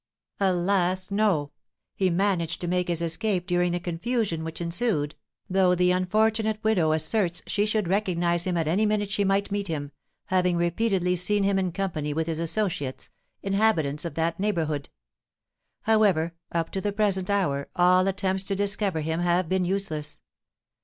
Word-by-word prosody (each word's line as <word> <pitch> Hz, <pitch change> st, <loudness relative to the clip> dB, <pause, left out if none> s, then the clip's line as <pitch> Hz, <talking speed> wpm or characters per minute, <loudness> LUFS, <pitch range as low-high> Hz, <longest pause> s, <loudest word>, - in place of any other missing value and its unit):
"Alas, 185 Hz, 0 st, +1 dB
no! 195 Hz, -9 st, +1 dB, 0.4 s
He 190 Hz, -1 st, +1 dB
managed 175 Hz, -2 st, 0 dB
to 175 Hz, -, -3 dB
make 180 Hz, 0 st, 0 dB
his 170 Hz, -1 st, -1 dB
escape 180 Hz, +2 st, -1 dB
during 175 Hz, 0 st, +1 dB
the 175 Hz, -, -1 dB
confusion 175 Hz, 0 st, -2 dB
which 160 Hz, 0 st, -5 dB
ensued, 170 Hz, -3 st, 0 dB, 0.3 s
though 185 Hz, -2 st, +3 dB
the 180 Hz, 0 st, +3 dB
unfortunate 215 Hz, +4 st, +1 dB
widow 185 Hz, -8 st, +2 dB
asserts 175 Hz, +3 st, 0 dB
she 205 Hz, +1 st, 0 dB
should 215 Hz, -3 st, 0 dB
recognise 175 Hz, -3 st, 0 dB
him 180 Hz, -1 st, 0 dB
at 165 Hz, -2 st, 0 dB
any 200 Hz, +7 st, +2 dB
minute 205 Hz, -1 st, 0 dB
she 200 Hz, -, +1 dB
might 195 Hz, +1 st, +1 dB
meet 200 Hz, 0 st, -1 dB
him, 145 Hz, -4 st, -4 dB, 0.3 s
having 180 Hz, -2 st, +1 dB
repeatedly 180 Hz, +1 st, +1 dB
seen 200 Hz, +3 st, +1 dB
him 195 Hz, 0 st, +2 dB
in 185 Hz, -2 st, -1 dB
company 160 Hz, -6 st, -3 dB
with 160 Hz, 0 st, 0 dB
his 165 Hz, -1 st, -2 dB
associates, 165 Hz, -6 st, -2 dB, 0.3 s
inhabitants 195 Hz, -8 st, +1 dB
of 170 Hz, -4 st, -5 dB
that 165 Hz, +1 st, -1 dB
neighbourhood. 160 Hz, -8 st, -1 dB, 0.9 s
However, 195 Hz, -7 st, +3 dB, 0.2 s
up 165 Hz, -1 st, -1 dB
to 190 Hz, -, -3 dB
the 205 Hz, -, -1 dB
present 200 Hz, -3 st, 0 dB
hour 145 Hz, -9 st, 0 dB
all 180 Hz, +1 st, +4 dB
attempts 190 Hz, 0 st, 0 dB
to 195 Hz, -, -1 dB
discover 200 Hz, -3 st, 0 dB
him 160 Hz, +2 st, -2 dB
have 175 Hz, 0 st, +1 dB
been 185 Hz, +1 st, +1 dB
useless. 165 Hz, -6 st, -3 dB
180 Hz, 160 wpm, -26 LUFS, 170-200 Hz, 0.9 s, all